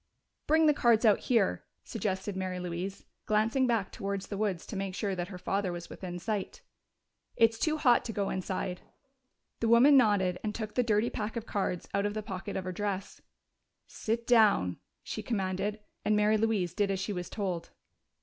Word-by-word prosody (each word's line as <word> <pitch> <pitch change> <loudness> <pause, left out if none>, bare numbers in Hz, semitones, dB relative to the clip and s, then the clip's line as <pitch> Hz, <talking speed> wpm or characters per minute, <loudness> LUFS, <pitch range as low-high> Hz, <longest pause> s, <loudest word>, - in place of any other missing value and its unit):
"Bring 320 +1 +4
the 300 - +6
cards 235 -4 +3
out 210 -2 +5
here," 220 - +1 0.2
suggested 190 -1 -3
Mary 185 -1 -3
Louise, 180 +2 -5 0.2
glancing 225 +5 +2
back 225 -6 0
towards 195 -1 -3
the 200 - -5
woods 200 -6 -1
to - - -7
make 195 -1 -3
sure 200 -1 -1
that 175 -1 -3
her 185 -2 -8
father 195 +1 -1
was 175 -1 -7
within 175 -2 -6
sight. 200 +2 -4 0.7
"It's 225 -1 +3
too 310 -1 +1
hot 245 -5 +4
to 230 - -3
go 200 -2 -1
inside." 185 -1 -3 0.8
The 225 - +1
woman 260 +5 +7
nodded 200 -7 +3
and 215 -1 -2
took 215 -2 -4
the 250 - +2
dirty 225 -1 +1
pack 220 +1 -4
of 230 -1 -4
cards 190 -5 -2
out 200 +1 +1
of 205 - -5
the 215 - -3
pocket 195 +1 -5
of 190 - -3
her 185 - -4
dress. 200 +1 -4 0.6
"Sit 230 +1 -3
down," 210 - +4 0.3
she - - -5
commanded, 200 0 -2 0.2
and 215 - +2
Mary 210 +1 +4
Louise 205 -6 +1
did 205 +1 +1
as 195 -1 -1
she 195 +2 -2
was 180 -2 -5
told. 185 -5 -3
205 Hz, 190 wpm, -30 LUFS, 185-225 Hz, 0.8 s, woman